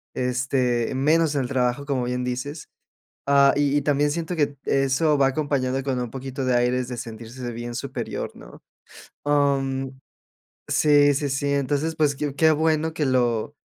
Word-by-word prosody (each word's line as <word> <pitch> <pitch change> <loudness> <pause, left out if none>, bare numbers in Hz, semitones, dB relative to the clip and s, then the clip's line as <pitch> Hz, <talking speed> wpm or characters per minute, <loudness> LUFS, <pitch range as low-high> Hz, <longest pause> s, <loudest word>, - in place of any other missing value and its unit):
Este, 125 -1 0
menos 155 +3 +2
en 140 - +1
el 125 - -2
trabajo, 125 +2 0
como 135 -3 -1
bien 125 0 -2
dices. 130 +5 -5 0.6
Ah, 140 0 +5
y 145 0 +1
y 145 - +2
también 145 0 +1
siento 165 +3 -3
que 145 -3 0
eso 135 +3 +2
va 135 -1 +4
acompañado 135 -2 -1
con 135 -2 -1
un 120 -2 -4
poquito 135 +1 -5
de 125 -1 +2
aires 125 +1 +1
de 125 - -5
sentirse 120 +1 -7
bien 120 +1 -6
superior, - - -4
¿no? - - -14 0.6
Am, 135 -2 0 0.7
sí, 145 -1 +4
sí, 145 +1 -1
sí. 140 +1 -1
Entonces, 145 +3 -1
pues, 150 -2 +2
qué 140 0 -3
qué 160 +2 +4
bueno 160 +1 +1
que 155 -2 -1
lo 125 0 0
135 Hz, 165 wpm, -24 LUFS, 125-145 Hz, 0.7 s, Ah